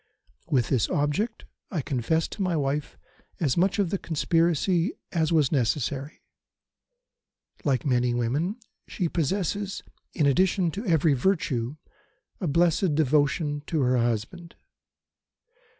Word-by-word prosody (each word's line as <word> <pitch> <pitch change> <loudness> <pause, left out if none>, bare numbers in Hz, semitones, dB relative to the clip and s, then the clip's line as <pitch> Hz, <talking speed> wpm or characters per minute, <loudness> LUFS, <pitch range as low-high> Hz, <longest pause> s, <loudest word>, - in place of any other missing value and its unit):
"With 125 -5 +2
this 125 -6 +1
object 165 +11 -1 0.2
I 170 -7 -2
confessed 140 +6 0
to - - -6
my 180 -3 +1
wife 145 +1 -2 0.4
as 145 -7 +1
much 185 +4 +2
of 195 -4 +1
the 195 - -1
conspiracy 170 - +1 0.2
as 160 -2 +1
was 155 -5 +3
necessary. 135 +2 -1 1.4
Like 135 -5 0
many 125 -2 +2
women, 140 - 0 0.3
she 180 - -2
possesses, 190 +5 -2 0.3
in 155 - +2
addition 180 +4 +2
to 200 +7 -5
every 160 -3 +3
virtue, 135 -5 0 0.6
a 180 - -2
blessed 170 +1 +2
devotion 145 0 +1
to 160 -3 0
her 125 -1 +2
husband. 120 +9 -2
155 Hz, 120 wpm, -26 LUFS, 135-175 Hz, 1.4 s, was